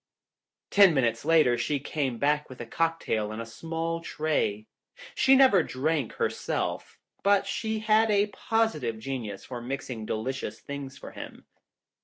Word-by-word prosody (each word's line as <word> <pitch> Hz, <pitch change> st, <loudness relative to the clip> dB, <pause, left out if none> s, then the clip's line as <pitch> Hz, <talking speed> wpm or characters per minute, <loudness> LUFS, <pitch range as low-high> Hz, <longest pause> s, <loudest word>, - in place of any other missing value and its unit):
Ten 195 Hz, -5 st, +7 dB
minutes 120 Hz, -2 st, +1 dB
later 155 Hz, -7 st, +4 dB
she 145 Hz, -2 st, 0 dB
came 135 Hz, -3 st, -2 dB
back 150 Hz, +3 st, +1 dB
with 130 Hz, -, -11 dB
a 120 Hz, -, -5 dB
cocktail 140 Hz, -7 st, -1 dB
on 110 Hz, +1 st, -6 dB
a 115 Hz, -, -4 dB
small 165 Hz, +7 st, -4 dB
tray. 150 Hz, -11 st, -1 dB, 0.5 s
She 270 Hz, -, +5 dB
never 260 Hz, -9 st, +6 dB
drank 145 Hz, -2 st, -1 dB
her -, -, +1 dB
self, -, -, -3 dB, 0.2 s
but 200 Hz, 0 st, +3 dB
she 220 Hz, +2 st, -2 dB
had 220 Hz, +1 st, +3 dB
a 205 Hz, -1 st, +4 dB
positive 210 Hz, -, -1 dB
genius 110 Hz, -4 st, -5 dB
for 125 Hz, -2 st, -6 dB
mixing 125 Hz, -3 st, -5 dB
delicious 110 Hz, 0 st, -3 dB
things 140 Hz, -2 st, -7 dB
for -, -, -10 dB
him. -, -, -10 dB
145 Hz, 150 wpm, -27 LUFS, 120-170 Hz, 0.5 s, Ten